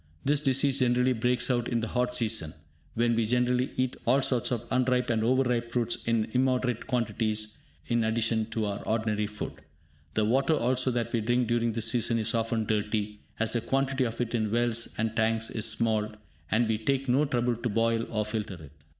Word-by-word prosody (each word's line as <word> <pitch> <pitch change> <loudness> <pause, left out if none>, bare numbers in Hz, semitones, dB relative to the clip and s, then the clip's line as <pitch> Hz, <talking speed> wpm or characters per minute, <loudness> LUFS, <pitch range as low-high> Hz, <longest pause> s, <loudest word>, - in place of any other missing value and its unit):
This 145 +1 +3
disease 135 -1 +2
generally 125 0 +3
breaks 125 +1 +1
out 120 -1 0
in 120 - 0
the 115 - -3
hot 125 0 0
season, 110 -10 0 0.4
when 120 +1 +2
we 115 0 +2
generally 125 +2 +1
eat 130 0 0
all 130 +3 +3
sorts 125 -4 +1
of 120 -2 -2
unripe 125 -1 +1
and 110 -1 +1
over 130 +3 +3
ripe 120 -2 -1
fruits 120 -1 -1
in 115 -2 +2
immoderate 125 -2 0
quantities 110 -3 -1 0.3
and 120 -1 +1
in - - +1
addition 115 -1 0
to 115 -1 -2
our 100 -1 -3
ordinary 110 -1 0
food. 105 0 -7 0.5
The 110 - +2
water 135 +7 +2
also 130 0 +1
that 120 -2 -2
we 115 - +1
drink 120 +2 +1
during 120 -1 +1
this 115 0 +1
season 120 -1 +1
is 115 0 0
often 115 -1 0
dirty, 105 0 -1 0.2
as 110 0 +1
the 120 - 0
quantity 135 +2 0
of 115 -1 -4
it 120 -1 -2
in 110 -3 0
wells 115 0 +1
and 110 0 -1
tanks 115 0 +1
is 110 0 0
small, 110 -1 0 0.4
and 115 +5 +2
we 110 -1 0
take 135 +4 -1
no 130 +4 +3
trouble 120 -3 0
to 120 +1 -2
boil 115 +1 +1
or 110 -2 -1
filter 105 -2 -4
it. 80 -4 -13
115 Hz, 200 wpm, -28 LUFS, 110-125 Hz, 0.5 s, This